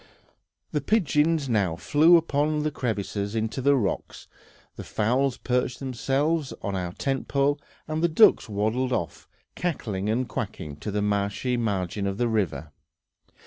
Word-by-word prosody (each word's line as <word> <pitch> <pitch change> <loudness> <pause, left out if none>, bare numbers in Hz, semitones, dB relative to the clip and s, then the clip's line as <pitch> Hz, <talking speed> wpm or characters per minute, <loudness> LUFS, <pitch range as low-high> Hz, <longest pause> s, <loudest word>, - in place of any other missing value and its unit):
The 150 - 0
pigeons 155 - +2
now 100 -8 +1
flew 150 - +5
up 165 0 -2
to 150 +1 +1
crevices 105 -4 -3
in 110 0 +1
the 135 +5 +2
rocks, 110 -8 -3 0.5
the - - -7
fowls 125 +4 0
perched 125 0 -1
themselves 135 +4 -1
on 100 -3 -2
our 90 -2 -3
tent 135 +4 -2
pole, 140 +1 +1 0.3
and 155 +1 -2
the - - +5
ducks 195 - +5
waddled 110 +5 0
off, 85 -8 -3 0.3
cackling 105 - -2
and 120 +3 0
quacking, 75 -2 -5
to 105 - -6
the 105 0 -1
marshy 105 +4 0
margin 100 -4 -1
of 100 0 -3
the 120 - +1
river. 80 -10 -1
125 Hz, 145 wpm, -26 LUFS, 100-145 Hz, 0.5 s, flew